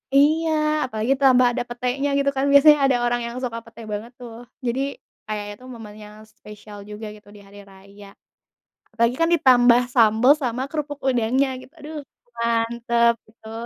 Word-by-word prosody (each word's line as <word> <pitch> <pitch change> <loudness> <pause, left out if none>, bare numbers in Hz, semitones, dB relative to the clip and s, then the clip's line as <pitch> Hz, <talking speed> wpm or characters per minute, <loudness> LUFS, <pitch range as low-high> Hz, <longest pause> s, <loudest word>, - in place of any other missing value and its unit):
Iya, 315 +3 +3 0.4
apalagi 220 +5 0
tambah 260 -2 +4
ada - - -2
petenya, 250 +3 -2
gitu 280 0 +1
kan. 270 +1 0
Biasanya 295 +1 +7
ada 260 -2 +2
orang 240 0 0
yang 235 +1 -6
suka 230 -2 -5
pete 230 0 -14
banget 220 +4 -6
tuh, 235 -1 -10 0.2
jadi 250 +3 -1 0.4
kayak 210 -1 -5
itu 250 - -20
momen 215 -3 -11
yang 210 0 -13
spesial 210 -1 -14
juga 210 +1 -8
gitu 205 -1 -19
di - - -13
hari 205 +1 -14
raya. 200 +1 -16 0.8
Apalagi 235 +3 0
kan 330 - +3
ditambah 245 -5 +5
sambel 230 +2 +5
sama 250 +1 -2
kerupuk 295 -2 -5
udangnya, 255 +2 +1
gitu. 260 - -16
Aduh, 300 +1 -8 0.4
mantep 235 0 +1 0.2
betul. 225 +1 -10
235 Hz, 165 wpm, -22 LUFS, 220-265 Hz, 0.8 s, Biasanya